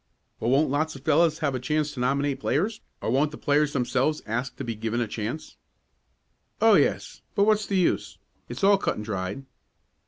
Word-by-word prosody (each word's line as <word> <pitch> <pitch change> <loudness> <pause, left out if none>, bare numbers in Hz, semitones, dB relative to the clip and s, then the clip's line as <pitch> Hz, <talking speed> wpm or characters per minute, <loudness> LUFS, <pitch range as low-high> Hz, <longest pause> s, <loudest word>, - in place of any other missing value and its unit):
"Well, 115 - -1
won't 135 +2 +3
lots 155 +2 0
of 135 - -11
fellows 155 0 +3
have 140 - 0
a 130 - -2
chance 150 +3 -1
to 140 - -8
nominate 140 +2 0
players, 205 - -1 0.2
or - - -1
won't 140 +4 +2
the 150 - -10
players 145 0 +1
themselves 130 +4 0
ask 120 +4 -3
to - - -6
be 115 - -3
given 115 +2 -2
a 120 - 0
chance?" 115 +8 -5 1.0
"Oh, - - +6
yes, - - +1
but 200 - +4
what's 215 0 +2
the 195 - 0
use? 180 - 0 0.3
It's - - -7
all 200 0 +5
cut - - -1
and 105 - -6
dried." 105 +5 -4
140 Hz, 195 wpm, -26 LUFS, 120-155 Hz, 1.0 s, Oh